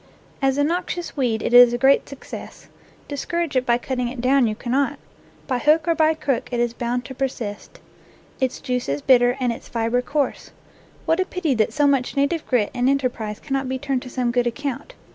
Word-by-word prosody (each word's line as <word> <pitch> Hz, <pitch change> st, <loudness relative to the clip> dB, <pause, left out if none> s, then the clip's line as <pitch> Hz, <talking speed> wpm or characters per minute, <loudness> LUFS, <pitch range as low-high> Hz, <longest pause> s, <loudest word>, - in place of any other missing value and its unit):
As 270 Hz, 0 st, +2 dB
a 290 Hz, -, +3 dB
noxious 345 Hz, +2 st, -2 dB
weed 240 Hz, -6 st, 0 dB
it -, -, -1 dB
is 245 Hz, -1 st, +9 dB
a -, -, 0 dB
great 270 Hz, +3 st, +3 dB
success. 275 Hz, -, -10 dB, 0.4 s
Dis 285 Hz, -2 st, -4 dB
courage 340 Hz, -4 st, -2 dB
it 255 Hz, 0 st, +1 dB
by 235 Hz, 0 st, +4 dB
cutting 250 Hz, 0 st, -2 dB
it 245 Hz, +1 st, -6 dB
down 255 Hz, 0 st, +3 dB
you 215 Hz, -, -2 dB
cannot. 265 Hz, +4 st, -1 dB, 0.5 s
By 255 Hz, -3 st, -1 dB
hook 300 Hz, +4 st, +3 dB
or 335 Hz, -, +4 dB
by 315 Hz, -1 st, +3 dB
crook 275 Hz, -6 st, -2 dB
it 240 Hz, -, -1 dB
is 240 Hz, -1 st, 0 dB
bound 245 Hz, +1 st, -2 dB
to 265 Hz, -, -7 dB
persist. 245 Hz, -6 st, -5 dB, 0.6 s
Its 260 Hz, -1 st, -1 dB
juice 250 Hz, -, -2 dB
is 140 Hz, +1 st, -2 dB
bitter 245 Hz, 0 st, +4 dB
and 245 Hz, -2 st, 0 dB
its -, -, -11 dB
fibre 230 Hz, +1 st, 0 dB
coarse. 285 Hz, +1 st, -2 dB, 0.5 s
What 325 Hz, -, +2 dB
a 375 Hz, -, +2 dB
pity 340 Hz, -7 st, -1 dB
that 220 Hz, -3 st, +1 dB
so 295 Hz, -1 st, +1 dB
much 275 Hz, -2 st, +1 dB
na 280 Hz, -, +4 dB
tive 325 Hz, +2 st, -3 dB
grit 235 Hz, -6 st, +1 dB
and 250 Hz, +1 st, +1 dB
enterprise 245 Hz, -6 st, -1 dB
cannot 270 Hz, -2 st, -2 dB
be 260 Hz, -, -1 dB
turned 270 Hz, -1 st, -2 dB
to 255 Hz, -, -9 dB
some 250 Hz, -1 st, -1 dB
good 245 Hz, 0 st, +1 dB
account! 280 Hz, -, -4 dB
255 Hz, 215 wpm, -22 LUFS, 240-280 Hz, 0.6 s, is